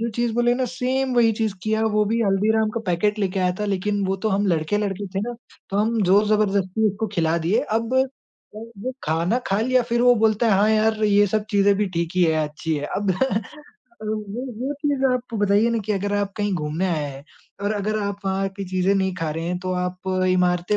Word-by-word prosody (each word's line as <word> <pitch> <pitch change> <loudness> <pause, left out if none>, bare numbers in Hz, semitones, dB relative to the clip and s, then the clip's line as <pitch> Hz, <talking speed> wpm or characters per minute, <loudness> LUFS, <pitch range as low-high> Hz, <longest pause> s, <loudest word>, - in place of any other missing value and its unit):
जो 230 - -1
चीज़ 240 -1 0
बोले 240 0 +3
ना 255 0 0
सेम 255 +1 -1
वही 230 -2 +4
चीज़ 215 -3 0
किया। 220 0 0
वो 210 0 +3
भी 230 +3 0
हल्दीराम 215 +2 +2
का 230 - -1
पैकेट 205 +4 +1
लेके 195 -1 -1
आया 180 0 +2
था 210 - 0
लेकिन 200 0 -1
वो 190 - 0
तो 220 - +3
हम 200 0 +1
लड़के-लड़की 195 +4 -1
थे 195 - 0
ना 240 +3 -4 0.4
तो 195 - -2
हम 220 +1 +1
ज़ोर-ज़बरदस्ती 205 +1 +2
उसको 215 +3 -3
खिला 165 -2 +1
दिए। 175 +8 +1 0.2
अब 230 +2 -3 0.6
वो 230 +2 -7
खाना 165 +9 +1
खा 195 +2 +1
लिया 255 +2 +2
फिर 235 0 -1
वो 245 0 +6
बोलता 220 0 +2
है 220 - +4
हाँ 210 +2 +4
यार! 220 0 +2
ये 205 0 +4
सब 215 +2 -1
चीजें 200 0 +4
भी 210 - +1
ठीक 170 -1 -1
ही 185 - +4
है, 160 -1 +2
अच्छी 155 +2 -3
है। 145 - -3
अब 200 -1 0 0.9
वो 215 +1 -4 0.3
वो 285 - -1
चीज़ 285 -3 0
आप 250 -2 -3
बताइए 205 +3 +3
ना 230 - 0
कि 215 - +1
अगर 200 +1 -2
आप 200 -1 -1
कहीं 205 -1 -1
घूमने 155 +3 -2
आए 160 -5 -1
हैं 135 +1 -11 0.4
और 205 - +1
अगर 215 +1 -1
आप 200 0 -2
वहाँ 195 0 0
की 200 - -4
चीज़ें 185 +1 +1
नहीं 190 -1 0
खा 165 -3 -2
रहे 165 +2 -4
हैं 180 +1 -2
तो 185 0 -3
आप 180 +1 -3 0.2
इमारतें 180 +2 +2
205 Hz, 220 wpm, -22 LUFS, 185-220 Hz, 0.9 s, वो